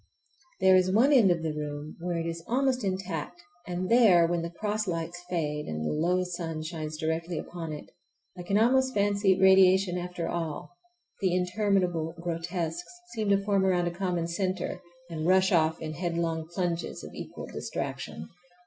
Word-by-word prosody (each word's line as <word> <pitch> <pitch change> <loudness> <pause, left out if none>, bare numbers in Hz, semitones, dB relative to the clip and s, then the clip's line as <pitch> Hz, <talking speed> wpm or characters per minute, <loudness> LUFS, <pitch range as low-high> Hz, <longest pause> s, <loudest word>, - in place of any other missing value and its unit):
There 190 0 +6
is 185 0 +3
one 245 +9 +4
end 230 -8 +6
of 170 -2 +1
the 160 -1 -1
room 150 0 -5
where 175 0 -2
it 165 - -2
is 165 0 -4
almost 260 0 +1
intact, 185 -4 -3 0.3
and 180 +1 -2
there, 210 -8 +6
when 170 0 0
the 170 - -4
cross 210 +4 -2
lights 170 0 -3
fade 150 -4 -2
and 80 0 -3
the - - 0
low 175 +4 +1
sun 170 -3 -4
shines 155 -1 -5
directly 160 +2 -2
upon 165 0 -6
it, 150 - -7 0.5
I 180 - -7
can 195 +3 0
almost 260 +4 +3
fancy 200 -2 +2
radiation 190 -1 +5
after 180 -1 -4
all,—the 195 - -5
interminable 180 -3 0
grotesques 170 0 -3 0.2
seem 215 -2 -1
to 200 0 +2
form 200 -2 +2
around 180 -2 +2
a 175 - -1
common 175 -2 -2
centre 185 +1 -2 0.3
and 160 -1 -3
rush 190 +1 +4
off 160 -2 +2
in 155 -1 -5
headlong 165 -1 -2
plunges 175 -1 -3
of - - -9
equal - - -7
distraction. 80 - -5
175 Hz, 165 wpm, -28 LUFS, 165-190 Hz, 0.5 s, There